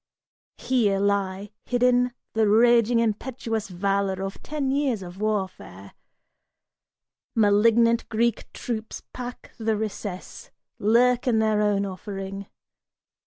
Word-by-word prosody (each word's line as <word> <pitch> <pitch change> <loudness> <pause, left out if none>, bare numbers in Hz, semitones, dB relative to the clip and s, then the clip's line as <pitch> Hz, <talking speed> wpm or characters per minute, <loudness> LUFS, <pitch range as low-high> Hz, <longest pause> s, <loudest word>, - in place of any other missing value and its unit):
Here 220 -7 +1
lie 200 0 -1
hidden 250 0 +2 0.2
The 220 -1 +2
raging 235 +2 +4
impetuous 225 0 -2
valor 195 +1 -1
of 195 0 -6
ten 285 -3 -2
years 270 -7 0
of 180 +2 -10
warfare. 190 - -3 1.4
Malignant 230 +2 +3
Greek 235 0 0
troops 225 -2 -5
pack 245 -1 -8
the 220 -1 0
recess, 205 -3 -6 0.3
lurk 245 +4 +3
in 235 -3 +3
their 215 -1 +2
own 205 -1 +1
offering. 195 0 -6
215 Hz, 105 wpm, -25 LUFS, 200-235 Hz, 1.4 s, raging